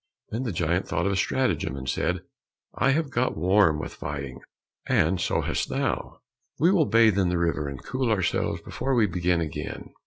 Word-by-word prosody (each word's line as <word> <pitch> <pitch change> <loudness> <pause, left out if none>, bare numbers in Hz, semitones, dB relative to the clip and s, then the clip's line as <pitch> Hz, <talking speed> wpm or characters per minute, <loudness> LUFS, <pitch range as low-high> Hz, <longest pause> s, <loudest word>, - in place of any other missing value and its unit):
Then 115 - -2
the 115 - -1
giant 85 +1 0
thought 85 +2 -1
of 100 - +2
a - - 0
stratagem, 125 - 0
and 65 -1 -7
said, - - -1 0.5
"I 130 - +1
have 145 0 +1
got 120 -5 0
warm 90 -1 +4
with 80 - -6
fighting, 70 -3 -6 0.5
and 85 +4 +2
so - - +1
hast - - -2
thou. - - -2 0.4
We 170 +4 +4
will 170 -7 +3
bathe 110 -3 +4
in 90 -2 +2
the 90 - 0
river, 80 -4 0
and 70 -2 -7
cool 130 -1 -1
ourselves 95 -6 0
before 135 -1 -2
we 115 -3 +4
begin 90 -2 0
again." 75 -3 -5
90 Hz, 190 wpm, -26 LUFS, 80-115 Hz, 0.5 s, warm